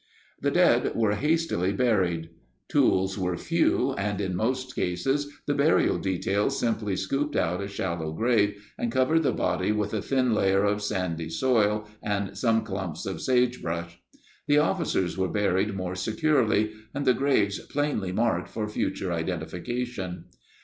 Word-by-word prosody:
The - - +2
dead - - +3
were 110 -3 +2
hastily 150 - +1
buried. 95 -8 +1 0.4
Tools 95 +1 +2
were 90 -2 -1
few, 160 -5 +1
and 100 -1 -2
in 95 -3 -2
most 130 +6 -1
cases 135 +12 -1
the 145 - +1
burial 145 +3 +3
details 95 +2 0
simply 110 -4 0
scooped 140 +10 -1
out 90 +3 0
a 100 - -3
shallow 85 -5 -3
grave 105 +1 0
and 120 - -1
covered 130 +6 +3
the 150 - +2
body 90 +2 0
with 105 -1 -1
a 110 - 0
thin 130 -1 +1
layer 95 -1 +3
of 105 0 +1
sandy 85 -5 -2
soil 105 +2 +1
and 100 -2 -2
some 115 +1 +2
clumps 95 -6 -5
of 95 -4 -4
sagebrush. 85 -10 0 0.5
The 145 0 +4
officers 150 - +1
were 95 - +2
buried 100 0 +1
more 90 -1 -3
securely 110 +2 +1 0.2
and 145 - -2
the 130 - +5
graves 120 -7 +1
plainly 145 -10 -2
marked 115 +4 0
for 110 -1 -3
future 100 -3 -2
identification. 90 +5 -4
105 Hz, 150 wpm, -27 LUFS, 95-125 Hz, 0.5 s, the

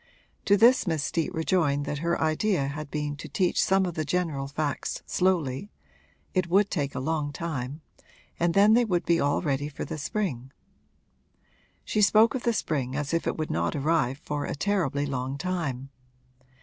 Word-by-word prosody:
To 200 0 +5
this 235 +1 +5
Miss 160 -4 0
Steet 165 +2 -1
rejoined 160 -4 +1
that 145 - -3
her 170 +2 0
idea 160 -1 +1
had 150 +1 -6
been 150 0 -3
to - - -8
teach 185 -3 +1
some 190 0 +3
of 175 - -3
the 155 - -2
general 150 -3 -1
facts 145 0 -3
slowly 180 -2 0 0.6
it 185 -2 0
would 200 +3 +3
take 145 -6 -2
a - - -2
long 150 +1 -1
time 145 -2 -4 0.6
and 170 +1 +1
then 205 +2 +6
they 240 +2 +5
would 180 -6 0
be 170 -1 +3
all 145 +4 +1
ready 145 -1 -1
for 145 - -6
the 155 - -5
spring. 135 - -3 1.3
She 215 - 0
spoke 215 +2 +5
of 260 - -2
the 235 - +1
spring 135 - -2
as 150 +1 -2
if 165 - 0
it - - -1
would 155 -1 -3
not 85 +1 -1
arrive 140 -3 +1
for 145 -1 -4
a - - -3
terribly 150 -5 0
long 135 0 -3
time. 145 -7 -3
155 Hz, 180 wpm, -27 LUFS, 140-185 Hz, 1.3 s, then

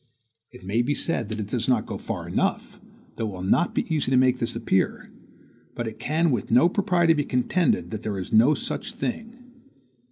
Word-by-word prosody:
It - - -15
may 105 +5 0
be 140 +4 0
said 120 -11 -2
that 110 - -2
it 105 - -3
does 115 +4 -2
not 125 -4 +2
go - - -6
far - - -5
enough, - - -2 0.4
though 115 - -2
it - - -5
will 90 -1 -7
not 170 - +2
be - - +1
easy 150 -4 0
to 130 - +3
make 130 0 +3
this 115 - -2
appear; 95 - -1 0.6
but 120 - -3
it 110 0 -7
can 155 +6 +1
with 120 -6 -2
no 125 +8 +5
propriety 175 -3 +2
be 150 -2 0
contended 140 +5 0
that 110 -2 -4
there 105 -3 -3
is 95 - -6
no 120 +8 +6
such - - -4
thing. 235 - -6
125 Hz, 210 wpm, -25 LUFS, 110-160 Hz, 0.6 s, no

